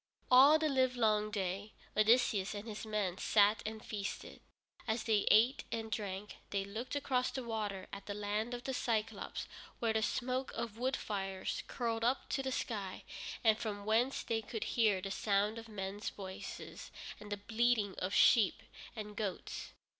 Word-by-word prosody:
All 275 Hz, +5 st, +9 dB
the 315 Hz, 0 st, +1 dB
livelong 245 Hz, -6 st, +2 dB
day 200 Hz, 0 st, -3 dB, 0.2 s
Odysseus 215 Hz, -2 st, +4 dB
and 205 Hz, +2 st, -6 dB
his 220 Hz, 0 st, -6 dB
men 205 Hz, -3 st, -1 dB
sat 210 Hz, 0 st, +4 dB
and 220 Hz, 0 st, -6 dB
feasted. 200 Hz, -2 st, -5 dB, 0.5 s
As 220 Hz, 0 st, 0 dB
they 220 Hz, -3 st, +2 dB
ate 235 Hz, +6 st, +5 dB
and 225 Hz, -1 st, -3 dB
drank, 205 Hz, -1 st, -4 dB
they 195 Hz, -1 st, -1 dB
looked 220 Hz, +7 st, -5 dB
across 260 Hz, -3 st, +1 dB
the 260 Hz, -, -4 dB
water 210 Hz, -4 st, -3 dB
at 200 Hz, 0 st, -7 dB
the 205 Hz, -, -3 dB
Land 210 Hz, +3 st, -1 dB
of 240 Hz, -, -7 dB
the 270 Hz, -, -2 dB
Cyclôpes, 225 Hz, -4 st, -1 dB, 0.3 s
where 230 Hz, -2 st, +1 dB
the 220 Hz, -, +2 dB
smoke 255 Hz, +3 st, -1 dB
of 225 Hz, -1 st, -4 dB
wood 260 Hz, +2 st, +1 dB
fires 195 Hz, -2 st, -3 dB
curled 230 Hz, -2 st, -2 dB
up 250 Hz, +3 st, +1 dB
to 270 Hz, -, 0 dB
the 265 Hz, 0 st, -2 dB
sky, 205 Hz, -7 st, -3 dB, 0.4 s
and 220 Hz, -1 st, +5 dB
from 205 Hz, -3 st, -4 dB
whence 235 Hz, +5 st, +2 dB
they 225 Hz, -1 st, 0 dB
could 225 Hz, 0 st, -4 dB
hear 215 Hz, -5 st, +3 dB
the 195 Hz, -, -3 dB
sound 205 Hz, +2 st, +1 dB
of 225 Hz, 0 st, -11 dB
men's 200 Hz, 0 st, -4 dB
voices 190 Hz, -2 st, -8 dB, 0.3 s
and 210 Hz, -1 st, -10 dB
the 205 Hz, -, -1 dB
bleating 220 Hz, -1 st, +1 dB
of 185 Hz, -, -1 dB
sheep 210 Hz, -3 st, +5 dB, 0.3 s
and 210 Hz, -2 st, -6 dB
goats. 205 Hz, -4 st, -4 dB
215 Hz, 170 wpm, -35 LUFS, 205-235 Hz, 0.5 s, All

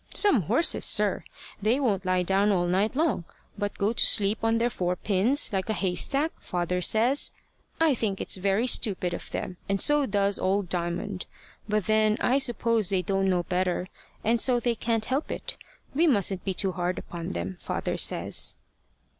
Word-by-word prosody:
Some 405 Hz, -, +4 dB
horses, 235 Hz, -, +2 dB
sir! -, -, +2 dB, 0.4 s
they 225 Hz, +6 st, +2 dB
won't 200 Hz, -8 st, 0 dB
lie 185 Hz, 0 st, +2 dB
down 195 Hz, +3 st, +2 dB
all 180 Hz, -3 st, +1 dB
night 195 Hz, +7 st, 0 dB
long, 295 Hz, -, 0 dB, 0.3 s
but 205 Hz, -1 st, -4 dB
go 205 Hz, +3 st, 0 dB
to -, -, +2 dB
sleep 210 Hz, 0 st, +2 dB
on 225 Hz, 0 st, +2 dB
their 235 Hz, +1 st, 0 dB
four 180 Hz, -3 st, -1 dB
pins, 215 Hz, +8 st, +1 dB
like 190 Hz, +2 st, -2 dB
a -, -, +1 dB
haystack, 275 Hz, -, +1 dB
father 180 Hz, 0 st, -2 dB
says. 235 Hz, +9 st, +3 dB, 0.5 s
I 325 Hz, -3 st, +4 dB
think 215 Hz, -5 st, -2 dB
it's -, -, 0 dB
very 195 Hz, +4 st, +1 dB
stupid 195 Hz, -8 st, +1 dB
of -, -, -6 dB
them, 180 Hz, -, -5 dB
and 195 Hz, 0 st, 0 dB
so 295 Hz, +2 st, +3 dB
does 200 Hz, -1 st, 0 dB
old 190 Hz, -1 st, 0 dB
Diamond. 180 Hz, +3 st, -3 dB, 0.4 s
But 210 Hz, -1 st, 0 dB
then 215 Hz, 0 st, +2 dB
I 265 Hz, +3 st, +2 dB
suppose 230 Hz, -5 st, +1 dB
they 190 Hz, -2 st, 0 dB
don't 195 Hz, -1 st, 0 dB
know 180 Hz, -2 st, +1 dB
better, 180 Hz, 0 st, -1 dB, 0.4 s
and 230 Hz, +1 st, +2 dB
so 250 Hz, -2 st, +3 dB
they 240 Hz, 0 st, 0 dB
can't 225 Hz, -1 st, -1 dB
help 270 Hz, +4 st, -2 dB
it. -, -, -5 dB, 0.4 s
We 325 Hz, +5 st, +3 dB
mustn't 200 Hz, -, +1 dB
be 190 Hz, -2 st, -2 dB
too 190 Hz, 0 st, 0 dB
hard 180 Hz, 0 st, -2 dB
upon 170 Hz, -1 st, -6 dB
them, 85 Hz, +2 st, -4 dB
father -, -, -3 dB
says." -, -, +1 dB
205 Hz, 180 wpm, -26 LUFS, 185-235 Hz, 0.5 s, Some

